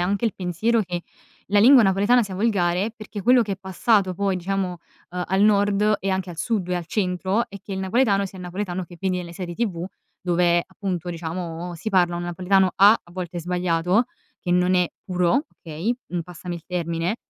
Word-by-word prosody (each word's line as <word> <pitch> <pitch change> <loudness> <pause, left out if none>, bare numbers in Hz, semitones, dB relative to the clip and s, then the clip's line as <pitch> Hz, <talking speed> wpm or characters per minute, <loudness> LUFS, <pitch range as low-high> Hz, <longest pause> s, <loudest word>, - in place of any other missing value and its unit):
anche 200 +5 0
il 225 - +1
pensiero 195 +6 0
che 175 -2 -4 0.4
la 205 +1 +2
lingua 250 +3 +8
napoletana 205 +5 +4
sia 200 -3 -5
volgare, 195 -1 +1
perché 215 -1 -7
quello 245 +3 +5
che 205 -2 -3
è - - -3
passato 190 0 +1
poi 195 0 0
diciamo, 185 -1 -2 0.3
ehm, 180 0 -3
al 190 +2 +2
nord 205 0 +3
e 195 - -2
anche 190 -1 -2
al 165 - -9
sud 185 0 -1
e 180 - +1
al 175 -2 -5
centro, 190 +3 0
è 200 - -9
che 200 - -8
il 190 - -3
napoletano 200 0 +2
sia 190 0 -8
il 180 - -7
napoletano 180 0 -4
che 175 +1 -14
vedi 185 +1 -1
nelle 170 -1 -7
serie 175 -2 -5
tv 180 -6 -2 0.4
dove 175 -1 +3
appunto, 180 -3 -4
diciamo, 170 +1 -5
si 175 +6 -5
parla 175 -3 +3
un 175 - -4
napoletano, 185 +2 +2
A: 200 +2 +8
a 175 - -21
volte 175 -1 -5
sbagliato, 180 +4 +1 0.4
che 180 - -4
non 180 +1 +3
è 180 -1 +3 0.2
puro, 180 - +1 0.2
okay, 165 +9 -2
mhmm, 175 -1 -2
passami 175 +1 -7
il 165 - -8
termine 170 +2 -2
185 Hz, 200 wpm, -23 LUFS, 175-200 Hz, 0.4 s, lingua